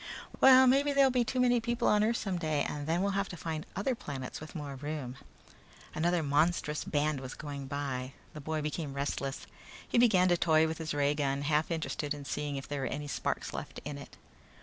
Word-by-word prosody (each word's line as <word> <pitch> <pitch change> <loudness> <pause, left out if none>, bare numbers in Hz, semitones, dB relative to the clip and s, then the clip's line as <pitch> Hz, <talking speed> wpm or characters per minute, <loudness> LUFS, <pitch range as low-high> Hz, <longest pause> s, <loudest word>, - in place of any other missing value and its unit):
"Well, 260 0 +8
maybe 280 +3 +4
there'll 275 -1 +5
be 250 -1 +2
too 255 +2 -2
many 245 -1 +4
people 240 +1 0
on 210 0 +4
earth 230 +2 +2
someday 165 -7 -1
and 145 0 -5
then 170 +3 +1
we'll 200 - +1
have 200 0 -1
to 180 - -7
find 160 -1 -4
other 205 +7 0
planets 135 - -6
with 155 +3 -10
more 145 -3 -5
room." 140 -2 -5 0.8
Another 170 +1 +1
monstrous 150 +1 +1
brass - - -9
band 150 -1 +1
was 130 0 -7
going 140 -2 -6
by. 135 -2 -3 0.2
The 150 - -8
boy 155 +1 -2
became 150 -2 -3
restless. 140 -1 -3 0.4
He - - +2
began 200 -7 +5
to 175 - +4
toy 160 -2 +4
with 160 0 -4
his 160 -2 -3
ray 145 0 +2
gun, 140 -1 -1
half 150 +1 +1
interested 160 -3 -2
in 145 -1 -9
seeing 145 +1 -3
if 135 - -5
there 145 -1 -3
were 135 - -1
any 145 +4 -4
sparks - - -3
left - - -6
in 145 -1 -5
it. 140 - -12
155 Hz, 215 wpm, -31 LUFS, 145-185 Hz, 0.8 s, Well